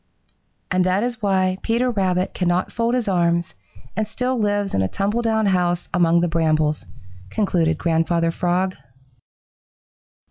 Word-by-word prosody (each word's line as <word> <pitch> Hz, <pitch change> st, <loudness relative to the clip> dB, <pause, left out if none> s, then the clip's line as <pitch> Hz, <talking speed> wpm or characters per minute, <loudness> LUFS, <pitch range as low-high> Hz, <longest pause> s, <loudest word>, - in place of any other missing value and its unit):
"And 185 Hz, 0 st, +3 dB
that 185 Hz, +3 st, +1 dB
is 240 Hz, -1 st, -3 dB
why 190 Hz, -2 st, +1 dB
Peter 240 Hz, +2 st, +1 dB
Rabbit 185 Hz, -4 st, 0 dB
cannot 180 Hz, 0 st, 0 dB
fold 235 Hz, +1 st, 0 dB
his 245 Hz, -4 st, -1 dB
arms 170 Hz, -2 st, +1 dB, 0.4 s
and 215 Hz, -1 st, -1 dB
still 250 Hz, +4 st, -2 dB
lives 205 Hz, -3 st, 0 dB
in 95 Hz, -, +1 dB
a 95 Hz, -, +1 dB
tumble 205 Hz, -, -1 dB
down 220 Hz, -2 st, +1 dB
house 180 Hz, -2 st, 0 dB
among 170 Hz, -1 st, +3 dB
the 175 Hz, -, +1 dB
brambles," 155 Hz, -, 0 dB, 0.4 s
concluded 165 Hz, -, +1 dB
Grandfather 165 Hz, 0 st, +1 dB
Frog. 180 Hz, +2 st, 0 dB
185 Hz, 140 wpm, -21 LUFS, 170-210 Hz, 0.4 s, And